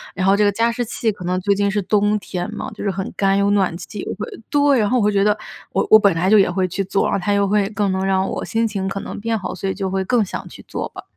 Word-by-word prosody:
然 185 - -1
后 195 +1 +5
这 210 - +2
个 205 - +4
加 230 +3 +1
湿 245 +1 -2
器 225 -1 -1
可 190 -3 -10
能 180 +1 0
最 200 +2 +2
近 200 0 +1
是 205 +1 0
冬 205 +2 +2
天 180 -3 -5
嘛， - - -6
就 - - -8
是 200 - 0
很 190 0 -4
干， 195 0 +2
有 200 0 +2
暖 190 -4 +1
气， 185 +4 -9
又 - - -4
会 210 +2 -4 0.2
对， 285 -2 +3
然 210 -2 +1
后 250 - +2
我 230 - +2
会 210 - +3
觉 200 -1 +2
得 210 0 +2 0.3
我 - - +1
我 215 - +10
本 200 -4 +3
来 170 +3 0
就 210 +2 +6
也 190 - +4
会 185 +1 0
去 190 +2 -2
做， 195 +1 0
然 - - -1
后 195 -3 -1
它 205 - +1
又 200 0 +2
会 200 -1 +1
更 205 -2 -1
能 190 0 -1
让 190 0 +1
我 - - -4
心 225 0 0
情 195 -3 -3
可 195 0 -3
能 - - -7
变 225 +1 -1
好， 190 - -5
所 195 - -3
以 - - -2
就 190 -1 -3
会 190 0 0
更 235 0 +2
想 - - -7
去 - - -13
做 - - -4
吧。 - - -10
200 Hz, 345 characters per minute, -20 LUFS, 190-210 Hz, 0.3 s, 我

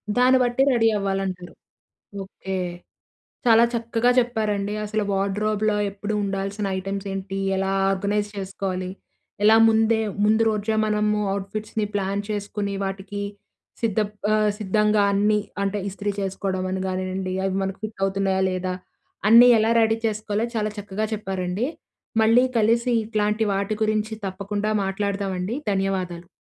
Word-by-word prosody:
దాన్ని 255 +1 +5
బట్టి 245 +2 +1
ready 225 -1 +3
అవ్వాలంటారు. 195 -2 -3 0.7
Okay. 190 0 -6 0.9
చాలా 230 0 +7
చక్కగా 230 +1 +1
చెప్పారండి 215 -4 0
అసలు 215 +1 -1
వార్డ్రోబ్‌లో 210 +2 0 0.2
ఎప్పుడు 205 +2 -4
ఉండాల్సిన 195 +1 -2
ఐటెమ్స్ 195 +1 -4
ఏంటి? 195 0 -4 0.2
ఎలా 195 0 0 0.2
ఆర్గనైజ్ 205 +2 0
చేసుకోవాలి? 190 -1 -3 0.5
ఎలా 220 +1 +7
ముందే 220 0 +3 0.2
ముందు 220 +1 +4
రోజే 215 +1 -1
మనము 210 0 +1
అవుట్ 195 0 -3
ఫిట్స్‌ని 215 0 -2
ప్లాన్ 200 0 -1
చేసుకొని, 205 -1 -3
వాటికి 195 +1 -5 0.6
సిద్ధ‌ప్ 210 -2 0 0.2
ఆహ్, 215 -1 +3
సిద్ధంగా 210 +1 +2
అన్నీ 210 +1 +3 0.2
అంటే 200 +1 -1
ఇస్త్రీ 200 +1 -3
చేసుకోవడం 190 -1 -2
అని 190 0 -2
కానివ్వండి, 185 0 -3
అవి 190 0 0
మనకు 195 0 -3
ఫిట్ 215 -2 -7
అవుతున్నాయా? 195 -1 0
లేదా? 185 0 -2 0.5
అన్నీ 235 +3 +9
ఎలా 220 +1 +2
రెడీ 225 0 +3
చేసుకోవాలో 215 +1 -1
చాలా 215 -1 0
చక్కగా 205 +1 -3
చెప్పారండి. 190 +1 -2 0.6
మళ్ళీ 230 +3 +5
కలిసి 235 +3 +2
ఇట్లాంటి 215 0 0
వాటి 200 +2 -1
గురించి 215 0 0
తప్పకుండా 200 +3 -2
మాట్లాడదామండి, 195 +1 -2 0.2
ధన్యవాదాలు. 185 -3 -2
205 Hz, 125 wpm, -23 LUFS, 195-215 Hz, 0.9 s, అన్నీ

